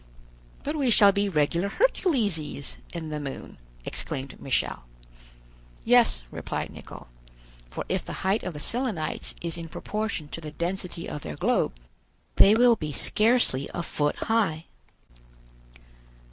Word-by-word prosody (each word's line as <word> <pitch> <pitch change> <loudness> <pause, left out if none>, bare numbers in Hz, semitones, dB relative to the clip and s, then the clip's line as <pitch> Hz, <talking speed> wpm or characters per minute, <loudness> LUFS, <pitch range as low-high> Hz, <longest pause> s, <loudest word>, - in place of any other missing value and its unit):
"But 295 +2 -2
we 280 -4 +1
shall 205 -3 +7
be 200 0 0
regular 170 +3 +1
Herculeses 205 - 0
in 165 -2 -5
the 150 0 -3
moon!" 140 - -7 0.3
exclaimed 135 0 -3
Michel. 130 - -1 1.0
"Yes," - - +5
replied - - -4
Nicholl; - - -11 0.6
"for - - -5
if - - -1
the - - -7
height 195 +4 +2
of 180 -4 -5
the - - -6
Selenites 225 - -2
is 170 0 -2
in 165 -1 -7
proportion 210 -5 -3
to 165 - -7
the 155 - -6
density 175 +2 -4
of 150 - -5
their 75 - -6
globe, 65 - +1 0.6
they 205 +2 +8
will 240 0 +6
be 155 -7 -5
scarcely 215 - +3
a 175 - -2
foot 145 -2 -1
high." 195 -9 0
175 Hz, 135 wpm, -26 LUFS, 150-220 Hz, 1.0 s, they